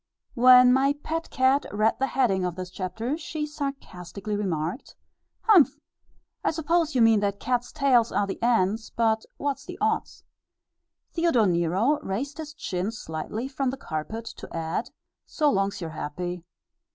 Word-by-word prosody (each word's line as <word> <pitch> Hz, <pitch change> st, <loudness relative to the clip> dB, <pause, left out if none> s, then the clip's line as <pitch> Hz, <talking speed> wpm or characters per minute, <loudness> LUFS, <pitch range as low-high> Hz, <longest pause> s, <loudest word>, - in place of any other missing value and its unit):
When 250 Hz, 0 st, +7 dB
my 270 Hz, +2 st, +3 dB
pet 325 Hz, +1 st, -3 dB
cat 260 Hz, +2 st, +2 dB
read 215 Hz, +2 st, +1 dB
the 270 Hz, -, +1 dB
heading 215 Hz, -9 st, +1 dB
of 180 Hz, -2 st, -2 dB
this 185 Hz, -1 st, -6 dB
chapter, 220 Hz, -, -3 dB
she 305 Hz, -1 st, -4 dB
sarcastically 220 Hz, -, -5 dB
remarked, 180 Hz, -, -3 dB, 0.5 s
"Humph! 390 Hz, -10 st, +5 dB, 0.7 s
I -, -, +2 dB
suppose 325 Hz, -1 st, 0 dB
you 245 Hz, -, +5 dB
mean 225 Hz, -2 st, +5 dB
that 200 Hz, 0 st, -1 dB
cats 245 Hz, -1 st, -1 dB
tails 265 Hz, -6 st, +3 dB
are 205 Hz, -, +1 dB
the 195 Hz, -, -6 dB
'ends'; 225 Hz, -2 st, +1 dB
but 225 Hz, -1 st, +1 dB
what's 280 Hz, -1 st, -2 dB
the 360 Hz, 0 st, -8 dB
'odds'?" 435 Hz, +1 st, -1 dB, 0.9 s
Theodore 330 Hz, -10 st, +3 dB
Nero 185 Hz, -, +2 dB
raised 275 Hz, +8 st, -4 dB
his 300 Hz, -1 st, -7 dB
chin 185 Hz, -8 st, -3 dB
slightly 215 Hz, +3 st, -5 dB
from 270 Hz, -1 st, -1 dB
the 265 Hz, -, -4 dB
carpet 215 Hz, -, -5 dB
to -, -, -9 dB
add, 165 Hz, +1 st, -3 dB, 0.4 s
"So 300 Hz, -2 st, +2 dB
long's 195 Hz, -2 st, 0 dB
you're 165 Hz, -2 st, -4 dB
happy." 175 Hz, +3 st, -5 dB
230 Hz, 150 wpm, -26 LUFS, 190-280 Hz, 0.9 s, When